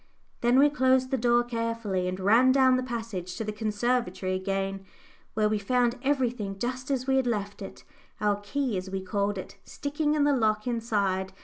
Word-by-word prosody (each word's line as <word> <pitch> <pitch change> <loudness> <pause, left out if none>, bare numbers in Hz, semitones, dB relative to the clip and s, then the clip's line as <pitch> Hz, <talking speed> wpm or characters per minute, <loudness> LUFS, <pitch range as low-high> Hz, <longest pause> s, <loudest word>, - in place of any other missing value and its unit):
Then 240 +2 +3
we 285 +2 +7
closed 260 -1 +2
the - - +2
door 240 0 +3
carefully 230 -6 -2
and 185 +1 -3
ran 225 +7 +5
down 260 -1 +5
the 255 - +1
passage 225 -8 -5
to - - -3
the 215 - -3
conservatory 210 -3 -1
again, 195 +1 -2 0.5
where 215 -1 +3
we 215 0 0
found 245 +3 +1
everything 245 -8 -1
just 255 +5 -4
as 260 -2 -1
we 265 0 +2
had 260 -2 +1
left 205 -3 -3
it 195 - -9 0.4
our 205 0 +1
key, 250 +1 -2
as 185 +1 -5
we 190 0 -3
called 200 +1 -1
it, 190 +1 -8
sticking 295 +1 -2
in 295 - +2
the 290 -1 +3
lock 215 -3 +1
inside. 200 -6 -1
230 Hz, 190 wpm, -27 LUFS, 200-255 Hz, 0.5 s, we